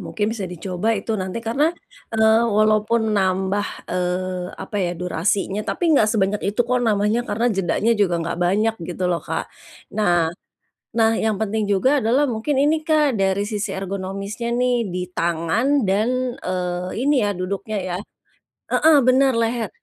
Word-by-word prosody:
mungkin 210 - -2
bisa 200 -5 -4
dicoba 180 +4 -3
itu 220 +3 -3
nanti 185 +4 -3
karena, 240 +6 +2 0.5
eee, 220 0 +5 0.2
walaupun 215 +1 +2
nambah, 190 +1 +1 0.2
eee, 180 0 -2
apa 210 - -6
ya 175 - 0
durasinya 190 +3 -1
tapi 335 -3 +1
enggak 220 -7 +4
sebanyak 205 -1 +1
itu 215 +4 -1
kok 250 +1 +1
namanya 210 +2 +2
karena 230 +4 0
jedanya 195 +4 +1
juga 185 -4 +3
enggak 170 0 -3
banyak 215 +5 +2
gitu 180 +1 -5
loh 170 - 0
Kak. - - -3 0.5
Nah 175 -6 +2 0.6
nah, 225 -1 +4
yang 220 -2 0
penting 215 0 -1
juga 260 +9 +3
adalah 255 +6 +2
mungkin 255 +3 -1
ini 300 +3 +3
Kak 305 -4 +2
dari 195 +1 +1
sisi 210 0 -3
ergonomisnya 195 +4 -4
nih 245 -3 +1
di 180 0 -3
tangan 175 - +1
dan, 245 +6 0
eee, 180 0 -3
ini 290 - +3
ya 205 - +1
duduknya 200 +4 -3
ya 185 -2 -3 0.8
heeh, 315 -1 +5
benar 260 +1 +4
leher 230 -2 0
210 Hz, 155 wpm, -21 LUFS, 185-235 Hz, 0.8 s, eee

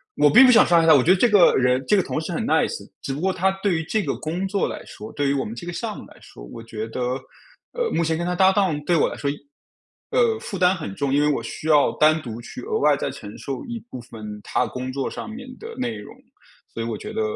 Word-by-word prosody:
我 145 0 +4
并 260 +4 +9
不 250 - +7
想 - - +7
伤 170 -1 +4
害 165 - +1
他， 160 - +8
我 130 - +4
觉 175 - +4
得 190 - +5
这 245 - +4
个 200 -4 +6
人， 125 0 +2
这 205 - +3
个 190 - +2
同 - - -3
事 - - -5
很 - - -2
nice， - - 0
只 135 - -4
不 140 - -5
过 190 +3 0
他 190 +1 +1
对 195 -4 +1
于 160 - -2
这 215 +6 -1
个 - - -2
工 175 +5 -3
作 200 0 -1
来 - - -6
说， 105 +1 -10
对 145 -1 -1
于 140 - +2
我 140 - -1
们 110 - -6
这 170 +9 -8
个 175 - -4
项 220 0 -4
目 - - -10
来 - - -17
说， - - -15
我 115 - -10
觉 110 -1 -6
得， 125 +3 -5 0.7
呃， 485 -1 -1
目 165 - +1
前 160 0 0
跟 175 - -3
他 180 - -1
搭 190 +1 +4
档 185 -7 +1
对 175 - +2
我 - - +3
来 - - -8
说 140 - -2
一 145 - -2 0.8
呃， 460 -3 +2
负 200 - -6
担 180 +1 +4
很 100 - -6
重， 140 -1 -1
因 145 - +3
为 150 - +3
我 115 - -2
需 155 - -7
要 150 -2 +4
单 155 +1 +4
独 115 -3 -7
去 - - -9
额 440 +2 -2
外 - - +4
再 - - -3
承 - - -10
受 - - -5
一 235 -1 -5
部 130 - -6
分 105 -3 -9
他 125 - 0
工 130 +3 -5
作 135 -1 -2
上 - - -7
面 250 +3 -8
的 455 +1 -9
内 115 -2 -3
容。 105 - -11 0.6
所 115 - -5
以 - - -3
我 115 -2 -3
觉 - - -8
得 - - -1
160 Hz, 320 characters per minute, -23 LUFS, 125-190 Hz, 0.8 s, 并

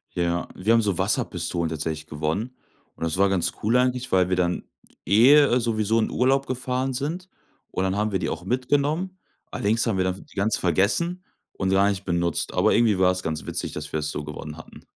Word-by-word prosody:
Ja. 85 0 -1
Wir 110 +5 +2
haben 115 - +5
so 100 -5 0
Wasserpistolen 85 -2 -1
tatsächlich 80 0 -4
gewonnen 80 - -3 0.4
und - - -7
das 85 +2 -1
war 100 0 +4
ganz 95 -3 +1
cool 115 +4 +2
eigentlich, 125 0 0
weil 90 -1 +3
wir 90 - +2
dann, 90 -1 0 0.4
eh, 125 - +6
sowieso 110 -1 +1
in 110 - 0
Urlaub 135 +3 +1
gefahren 130 +1 -2
sind 165 +8 -4 0.4
und 95 - -1
dann 95 +1 0
haben 105 +1 0
wir 95 - 0
die - - -2
auch 85 +2 -5
mitgenommen. 145 - 0 0.3
Allerdings 110 +3 0
haben 100 -4 0
wir 95 - +2
dann 95 +1 -3
ganz 105 +2 +1
vergessen 120 - +1 0.3
und 95 -1 -2
gar 100 +1 +4
nicht 100 -1 -3
benutzt. 85 -2 -1
Aber - - +3
irgendwie 110 -5 +3
war 90 0 +5
es 90 - -4
ganz 80 -1 -3
witzig, - - -3
dass 75 -1 -6
wir 80 - 0
das 75 0 -3
so 75 - -4
gewonnen 75 +1 -7
hatten. 80 - -13
100 Hz, 205 wpm, -24 LUFS, 85-125 Hz, 0.4 s, eh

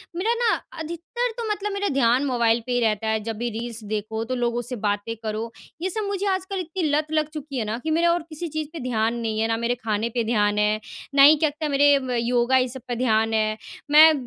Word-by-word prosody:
मेरा 435 +7 +1
ना 475 -1 +2 0.3
अधिकतर 345 +10 -3
तो 470 - -3
मतलब 415 0 -2
मेरा 400 0 -1
ध्यान 255 +1 +3
मोबाइल 235 -3 +2
पे 250 - -4
ही 245 - +2
रहता 220 -1 +1
है। 220 0 +1
जब 225 -1 -4
भी 240 +1 -2
रील्स 230 0 -5
देखो, 215 +1 -3
तो 255 +2 -2
लोगों 240 0 0
से 245 +2 -5
बातें 205 +1 -2
करो, 220 +1 -3 0.3
ये 375 - 0
सब 435 +2 -2
मुझे 400 0 -2
आजकल 375 +1 -3
इतनी 350 +1 -4
लत 300 +1 +1
लग 310 -1 +1
चुकी 290 -3 -6
है 220 - -1
ना 220 +2 -2
कि 315 - -1
मेरा 340 +2 +3
और 345 -1 +1
किसी 320 +2 -5
चीज़ 310 -1 -4
पे 325 - -6
ध्यान 230 -1 0
नहीं 220 -1 -2
है। 225 - +2
ना 225 0 0
मेरे 235 +1 0
खाने 225 -1 -2
पे 235 0 -1
ध्यान 210 -2 +1
है, 210 +1 +2 0.4
ना 275 - +7
ही 305 +2 +9
क्या 310 - +5
लगता 300 +1 -4
मेरे 285 +1 +4 0.3
योगा 240 +2 +2
ये 255 0 +2
सब 255 +1 -8
पे 245 - -2
ध्यान 225 -2 +1
है। 215 0 +1 0.3
मैं 315 +1 +9
245 Hz, 245 wpm, -24 LUFS, 225-315 Hz, 0.4 s, ही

